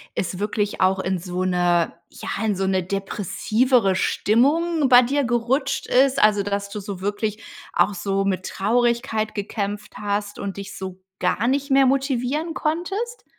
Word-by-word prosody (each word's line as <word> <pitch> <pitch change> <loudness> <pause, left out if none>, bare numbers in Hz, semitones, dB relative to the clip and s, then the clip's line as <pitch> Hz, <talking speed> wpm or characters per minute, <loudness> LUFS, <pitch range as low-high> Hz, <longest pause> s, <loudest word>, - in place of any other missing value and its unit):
es 180 0 -3
wirklich 205 0 -1
auch 190 +1 +3
in 190 -1 -1
so 180 +1 -3
'ne 175 -2 +2 0.2
ja, - - -8 0.2
in 210 -2 +1
so' 190 0 -1
ne 190 -1 +1
depressivere 200 +3 +1
Stimmung 290 - +2
bei 250 -1 +8
dir 280 +3 0
gerutscht 265 +3 0
ist, 265 -1 +3
also, 210 -1 +5
dass 200 0 -3
du 210 - -5
so 195 -2 -7
wirklich 210 +2 -2 0.3
auch 205 - +3
so 195 +1 -1
mit 190 -1 -1
Traurigkeit 230 0 0
gekämpft 205 0 -4
hast 205 0 -3
und 200 -1 -4
dich 200 0 -8
so 190 -1 -7 0.2
gar 180 +6 +1
nicht 280 +1 0
mehr 270 0 +5
motivieren 275 +4 0
konntest? 390 +11 -3
210 Hz, 155 wpm, -22 LUFS, 195-265 Hz, 0.3 s, bei